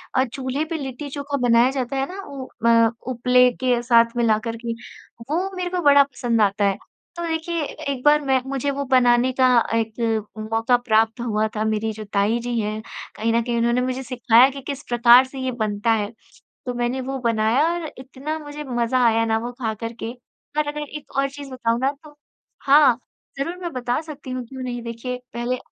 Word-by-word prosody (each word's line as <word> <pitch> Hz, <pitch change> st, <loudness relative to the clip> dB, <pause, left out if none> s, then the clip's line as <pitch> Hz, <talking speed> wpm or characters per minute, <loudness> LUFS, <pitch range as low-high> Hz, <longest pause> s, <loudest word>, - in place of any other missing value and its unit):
अ, 260 Hz, -, +4 dB
चूल्हे 265 Hz, +3 st, -3 dB
पे 325 Hz, +1 st, -4 dB
लिट्टी-चोखा 280 Hz, +1 st, -5 dB
बनाया 235 Hz, +2 st, +5 dB
जाता 265 Hz, -1 st, -3 dB
है 270 Hz, -, +1 dB
ना 395 Hz, -, -6 dB
उ 275 Hz, -6 st, -8 dB, 0.2 s
म 230 Hz, -1 st, +5 dB, 0.2 s
उपले 250 Hz, +1 st, +4 dB
के 245 Hz, -2 st, +2 dB
साथ 230 Hz, -1 st, +4 dB
मिलाकर 230 Hz, 0 st, +1 dB
के, 230 Hz, -, -1 dB, 0.6 s
वो 355 Hz, +6 st, 0 dB
मेरे 360 Hz, -1 st, -2 dB
को 360 Hz, 0 st, -2 dB
बड़ा 285 Hz, -2 st, +7 dB
पसंद 240 Hz, -4 st, -1 dB
आता 200 Hz, 0 st, +2 dB
है। 195 Hz, -1 st, +1 dB, 0.4 s
तो 345 Hz, -, -5 dB
देखिए 325 Hz, +1 st, -2 dB, 0.3 s
एक 255 Hz, -2 st, -5 dB
बार 300 Hz, 0 st, +6 dB
मैं 265 Hz, -1 st, +2 dB
मुझे 275 Hz, +1 st, -1 dB
वो 280 Hz, 0 st, -3 dB
बनाने 250 Hz, -1 st, +4 dB
का 260 Hz, -, +6 dB, 0.3 s
एक 225 Hz, -1 st, -1 dB, 0.2 s
मौका 225 Hz, +2 st, +3 dB
प्राप्त 225 Hz, -1 st, +1 dB
हुआ 220 Hz, -2 st, 0 dB
था, 215 Hz, -, 0 dB
मेरी 220 Hz, 0 st, 0 dB
जो 215 Hz, -, -7 dB
ताई 205 Hz, +3 st, +2 dB
जी 240 Hz, 0 st, -2 dB
हैं 215 Hz, 0 st, -2 dB, 0.3 s
कहीं 225 Hz, +1 st, 0 dB
न 235 Hz, -, +3 dB
कहीं 240 Hz, 0 st, -1 dB
उन्होंने 235 Hz, +1 st, +2 dB
मुझे 255 Hz, +1 st, -2 dB
सिखाया 245 Hz, 0 st, +4 dB
कि 275 Hz, 0 st, -8 dB
किस 280 Hz, 0 st, -5 dB
प्रकार 240 Hz, +2 st, +7 dB
से 265 Hz, +1 st, -9 dB
ये 260 Hz, 0 st, -1 dB
बनता 215 Hz, -1 st, -1 dB
है। 215 Hz, -1 st, 0 dB, 0.6 s
तो 250 Hz, -, -2 dB
मैंने 245 Hz, +2 st, -1 dB
वो 265 Hz, +1 st, -4 dB
बनाया 230 Hz, +5 st, +2 dB
और 345 Hz, -2 st, -3 dB
इतना 270 Hz, +4 st, -5 dB
मुझे 300 Hz, -1 st, -8 dB
मज़ा 245 Hz, -1 st, 0 dB
आया 225 Hz, 0 st, +3 dB
ना 220 Hz, 0 st, +1 dB
वो 240 Hz, +2 st, -5 dB
खा 225 Hz, -3 st, -1 dB
कर 230 Hz, 0 st, -3 dB
के 225 Hz, -, -3 dB, 0.5 s
और 300 Hz, -, +2 dB
अगर 295 Hz, 0 st, -4 dB
एक 300 Hz, -2 st, -10 dB
और 275 Hz, -, +2 dB
चीज़ 280 Hz, -1 st, -9 dB
बताऊँ 235 Hz, -2 st, -1 dB
ना 265 Hz, +1 st, +2 dB
तो 295 Hz, -1 st, -15 dB, 0.5 s
हाँ, 275 Hz, -3 st, +5 dB, 0.4 s
ज़रूर 335 Hz, +6 st, -2 dB
मैं 345 Hz, -3 st, -4 dB
बता 245 Hz, +2 st, -1 dB
सकती 300 Hz, -4 st, -9 dB
हूँ, 255 Hz, -1 st, -4 dB
क्यों 260 Hz, +2 st, -8 dB
नहीं? 245 Hz, -1 st, -4 dB
देखिए 235 Hz, +2 st, -5 dB, 0.2 s
पहले 240 Hz, +2 st, -2 dB
250 Hz, 200 wpm, -22 LUFS, 230-275 Hz, 0.6 s, बड़ा